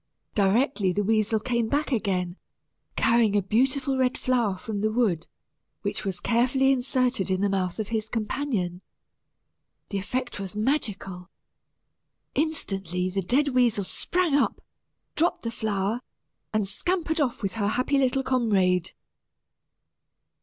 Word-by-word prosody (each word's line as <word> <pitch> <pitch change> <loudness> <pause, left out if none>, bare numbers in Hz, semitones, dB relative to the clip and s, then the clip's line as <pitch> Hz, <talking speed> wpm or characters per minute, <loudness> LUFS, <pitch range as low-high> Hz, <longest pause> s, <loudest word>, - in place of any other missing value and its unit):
Directly 205 0 +2
the 205 - 0
weasel 220 +1 +2
came 235 0 0
back 290 +3 0
again, 190 -6 -1 0.6
carrying 230 -3 +3
a 205 - +4
beautiful 260 +6 +1
red 255 -1 +2
flower 235 -7 +1
from 205 +1 -4
the 215 +1 +1
wood, 210 -8 +1 0.6
which - - -2
was 190 -2 -2
carefully 255 +3 +3
inserted 255 -5 +1
in 190 0 +1
the 205 - +2
mouth 185 -2 -1
of 215 -2 -3
his 220 -1 -2
companion. 215 -6 -2 1.1
The 200 - -1
effect 245 +4 -3
was 195 0 -6
magical. 210 - -2 1.0
Instantly, 195 - -1
the 195 +1 -1
dead 270 +10 +2
weasel 245 -6 +2
sprang 350 - 0
up, 285 - +2 0.6
dropped 340 +3 +1
the 230 - -2
flower, 215 0 -1 0.5
and 215 -2 0
scampered 325 - -1
off 250 -5 -1
with 195 -2 -1
her 205 -1 0
happy 255 +6 +1
little 265 0 +2
comrade. 190 -9 +2
220 Hz, 130 wpm, -26 LUFS, 195-255 Hz, 1.1 s, a